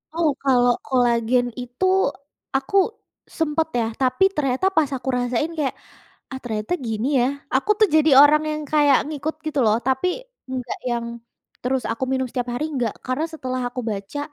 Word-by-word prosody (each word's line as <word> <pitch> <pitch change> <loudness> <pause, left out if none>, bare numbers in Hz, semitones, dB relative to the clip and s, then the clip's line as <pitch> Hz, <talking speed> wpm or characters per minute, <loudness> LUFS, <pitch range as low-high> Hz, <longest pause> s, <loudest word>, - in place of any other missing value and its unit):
Oh, 335 -2 +2
kalau 245 -3 +4
kolagen 245 -1 +2
itu 245 +9 -3 0.7
aku 270 +8 -5 0.6
sempet 320 0 +1
ya 230 - +1 0.2
tapi 260 +8 +2
ternyata 270 +1 0
pas 305 -3 +3
aku 255 - -13
rasain 245 +6 -1
kayak, 285 -4 -1 0.6
ah 265 - -4
ternyata 215 0 -3
gini 220 +1 -2
ya. 240 - +3 0.3
Aku 270 +10 +1
tuh 430 - +6
jadi 310 0 +4
orang 300 +1 +6
yang 305 0 -3
kayak 290 -3 +5
ngikut 305 +1 -3
gitu 300 -2 -2
loh, 215 - +4
tapi 265 +6 +1 0.4
enggak 255 -2 -4
yang 235 -1 -1 0.6
terus 255 +1 -1
aku 230 +3 -2
minum 260 0 +1
setiap 245 0 -3
hari 245 - -2
enggak, 245 -6 -1
karena 255 +5 -1
setelah 255 -4 -3
aku 250 +1 -5
baca, 200 +6 -5
260 Hz, 165 wpm, -22 LUFS, 245-300 Hz, 0.7 s, tuh